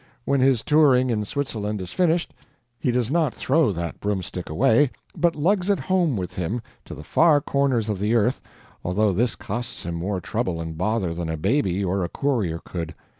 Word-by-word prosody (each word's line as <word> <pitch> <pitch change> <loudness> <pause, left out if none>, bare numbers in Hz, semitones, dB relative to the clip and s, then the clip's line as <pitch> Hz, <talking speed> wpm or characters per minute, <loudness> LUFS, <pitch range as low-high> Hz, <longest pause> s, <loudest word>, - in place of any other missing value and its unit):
When 140 0 +2
his 130 -3 +3
touring 135 -5 +4
in 105 -2 -1
Switzerland 105 -5 -3
is 90 -1 -6
finished, 175 -1 +1 0.5
he - - 0
does 125 0 0
not 160 -5 +1
throw 145 -3 +2
that 85 -2 -4
broomstick 95 -3 -3
away, 110 - +3 0.3
but 170 -1 +2
lugs 185 +5 +1
it 200 - +3
home 175 - +1
with 90 -2 -4
him, 95 +7 -2 0.3
to - - -8
the - - -9
far 160 -3 +4
corners 140 -6 0
of 105 -3 -2
the 105 +4 +1
earth, 120 +3 +2 0.4
although 100 +4 +2
this 115 +5 +1
costs 120 0 -5
him 85 - -3
more 90 +3 -2
trouble 110 -4 -2
and 80 -1 -5
bother 95 0 0
than 85 -1 -4
a 80 - -2
baby 100 - +1
or 95 +1 0
a 85 - -2
courier 110 -14 -1
could. 85 -2 -5
110 Hz, 190 wpm, -24 LUFS, 90-140 Hz, 0.5 s, touring